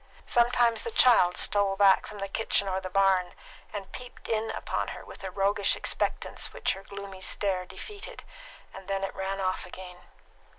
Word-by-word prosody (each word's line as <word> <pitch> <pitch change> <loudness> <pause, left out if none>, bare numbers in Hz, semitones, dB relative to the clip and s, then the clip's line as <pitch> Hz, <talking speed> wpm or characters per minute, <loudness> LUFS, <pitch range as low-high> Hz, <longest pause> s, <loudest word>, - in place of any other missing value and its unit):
Sometimes 240 -1 +3
the - - -2
child 240 - +5
stole 200 -1 +2
back 195 -1 +5
from 210 - -9
the 195 0 -3
kitchen 200 0 +1
or 190 0 -1
the 185 - -5
barn, 190 -1 +2 0.4
and 195 -2 -6
peeped 250 0 -10
in 220 0 0
upon - - -2
her - - -7
with - - -11
a 190 - -3
roguish 200 +1 +2
expectance - - -2
which - - 0
her 195 - -9
gloomy 200 -1 -9
stare 185 -1 0
defeated, 420 - -8 0.5
and 195 -1 -11
then 195 0 -1
it 195 - -3
ran 195 0 -3
off 185 -1 -1
again. 180 0 -10
195 Hz, 175 wpm, -28 LUFS, 190-210 Hz, 0.5 s, child